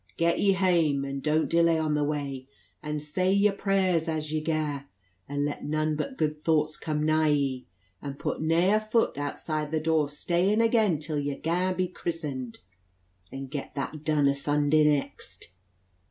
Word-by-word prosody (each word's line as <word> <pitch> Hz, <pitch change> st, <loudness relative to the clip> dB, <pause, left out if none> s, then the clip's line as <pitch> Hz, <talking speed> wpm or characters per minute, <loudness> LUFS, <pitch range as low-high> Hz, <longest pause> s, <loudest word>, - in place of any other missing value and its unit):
"Get 170 Hz, 0 st, +2 dB
ye 200 Hz, -1 st, +4 dB
heyame, 165 Hz, -7 st, +2 dB
and 135 Hz, 0 st, -4 dB
don't 155 Hz, +2 st, +1 dB
delay 170 Hz, -1 st, +3 dB
on 155 Hz, -1 st, 0 dB
the 150 Hz, 0 st, +1 dB
way; 140 Hz, -3 st, -3 dB, 0.3 s
and 150 Hz, -1 st, -4 dB
say 185 Hz, +5 st, 0 dB
yer 200 Hz, +1 st, +4 dB
prayers 190 Hz, -4 st, +1 dB
as 155 Hz, -2 st, -2 dB
ye 155 Hz, 0 st, -1 dB
gaa; 155 Hz, -3 st, -2 dB, 0.4 s
and 145 Hz, 0 st, -1 dB
let 145 Hz, -, -4 dB
none 155 Hz, +1 st, 0 dB
but 260 Hz, -, -4 dB
good 150 Hz, 0 st, -1 dB
thoughts 155 Hz, -1 st, +2 dB
come 150 Hz, -1 st, -2 dB
nigh 155 Hz, 0 st, +3 dB
ye; 140 Hz, -4 st, 0 dB, 0.3 s
and 140 Hz, -1 st, -6 dB
put -, -, -3 dB
nayer 170 Hz, +6 st, +3 dB
foot 215 Hz, +1 st, +1 dB
autside 150 Hz, +2 st, -3 dB
the 160 Hz, 0 st, 0 dB
door 155 Hz, -1 st, +2 dB
steyan 175 Hz, +8 st, +1 dB
again 225 Hz, -6 st, +3 dB
till 150 Hz, 0 st, -3 dB
ye 145 Hz, -1 st, -2 dB
gaa 175 Hz, +5 st, 0 dB
to 185 Hz, -, -2 dB
be 185 Hz, 0 st, 0 dB
christened; 150 Hz, -9 st, -5 dB, 0.7 s
and 135 Hz, 0 st, -7 dB
get 145 Hz, -3 st, -6 dB
that 150 Hz, +2 st, -4 dB
done 150 Hz, -2 st, +2 dB
a 140 Hz, -, +4 dB
Sunda' 145 Hz, +2 st, +2 dB
next." 145 Hz, -10 st, -1 dB
155 Hz, 175 wpm, -27 LUFS, 145-170 Hz, 0.7 s, ye